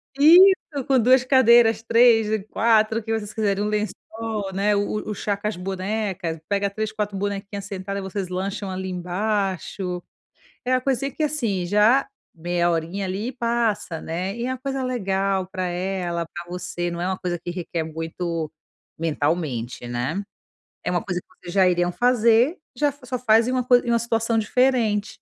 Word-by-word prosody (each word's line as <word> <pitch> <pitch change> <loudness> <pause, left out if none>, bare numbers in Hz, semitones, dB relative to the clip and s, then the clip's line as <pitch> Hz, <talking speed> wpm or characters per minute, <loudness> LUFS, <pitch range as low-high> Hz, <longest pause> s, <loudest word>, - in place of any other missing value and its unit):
Isso, 325 -2 +6
com 265 -2 +4
2 255 +2 +5
cadeiras, 235 -4 +5
3 230 -1 +5
e 215 0 0
4, 220 0 +2
o - - -10
que 225 - -4
vocês 215 -2 -3
quiserem. 205 -2 0
Um - - 0
lençol, 210 0 -3
né, 205 +2 +2
o 210 +1 -2
o - - -1
chá 200 +1 -2
com 210 - -3
as 210 - -2
bonecas. 190 -2 -3
Pega 200 0 0
3, 215 +2 -3
4 210 -2 -3
bonequinhas 200 0 -4
sentadas, 200 0 -5
e - - -7
vocês 190 -1 -4
lancham 195 +2 -3
ali 190 0 -4
embaixo. 185 0 -2 0.6
É 255 - 0
a 255 - +3
coisinha 275 +1 -1
que 310 - -4
assim, 230 -12 -1
já, 210 +8 +4 0.3
meia 175 +1 0
horinha 170 +4 -2
ali, 195 +5 -3
e 260 - -4
passa, 230 -8 -1
né. 185 +6 -4
E 240 +1 -3
é - - -2
uma 260 - -3
coisa 270 0 -3
legal 195 -6 0
pra 185 -1 -3
ela, 175 -1 -2
pra 175 - -8
você, 175 -1 -4
não 170 0 -5
é 180 - -1
uma 190 0 -2
coisa 175 -1 -3
que 175 - -6
requer 175 -2 -3
muito 165 0 -4 0.5
mentalmente, 145 -7 -2
né. 130 +11 -2 0.6
É - - -1
uma 175 - 0
coisa 180 -4 -3
que - - -34 0.2
vocês 175 - -7
já 190 -2 +5
iriam 175 0 +1
fazer, 240 - +3 0.2
já 290 +2 +2
fa 280 -2 -20
só 255 0 -2
faz 230 0 +4
em - - 0
uma 255 -1 0
coi 245 -1 +5
em 240 - -4
uma 235 - +4
situação 230 0 0
diferente. 220 -2 +1
205 Hz, 190 wpm, -23 LUFS, 180-235 Hz, 0.6 s, Isso